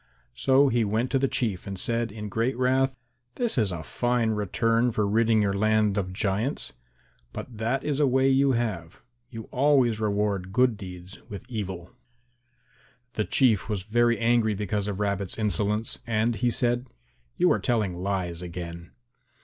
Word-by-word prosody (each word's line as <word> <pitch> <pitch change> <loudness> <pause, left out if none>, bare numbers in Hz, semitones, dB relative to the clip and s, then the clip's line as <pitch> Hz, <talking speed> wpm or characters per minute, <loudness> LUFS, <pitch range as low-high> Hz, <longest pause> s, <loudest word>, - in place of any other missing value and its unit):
So 135 - +4
he 120 -2 +2
went 110 +4 -1
to 135 - +2
the 135 - +2
Chief 110 -9 -1
and 95 -1 -5
said 115 0 -1
in 105 0 -6
great 115 +5 -1
wrath, 130 +1 +1 0.4
"This 240 -2 0
is 110 -7 +1
a 85 -3 -5
fine 120 +3 0
return 115 +3 +1
for 105 -2 0
ridding 110 +1 +3
your 100 -1 +1
land 110 0 +2
of 95 -3 -2
giants. 100 +7 -2 0.6
But 115 -4 -8
that 120 +5 0
is 145 -1 -1
a 145 - +4
way 130 +1 +3
you 135 0 +3
have; 105 -9 -3 0.3
you 115 -3 -7
always 130 -4 +3
reward 100 -3 -1
good 125 +2 +3
deeds 90 -2 -10
with 100 +4 -8
evil." 95 -6 -5 1.2
The 105 - -1
Chief 110 +1 +2
was 100 -4 -2
very 120 +3 +2
angry 115 -2 +2
because 105 0 -2
of 100 -1 -3
Rabbit's 100 -2 -2
insolence, 105 0 -1
and 115 +1 +1
he 125 - +1
said, 120 +1 +1 0.5
"You - - +4
are - - +2
telling 110 -6 0
lies 90 -2 -3
again." 85 -1 -7
110 Hz, 165 wpm, -26 LUFS, 100-120 Hz, 1.2 s, So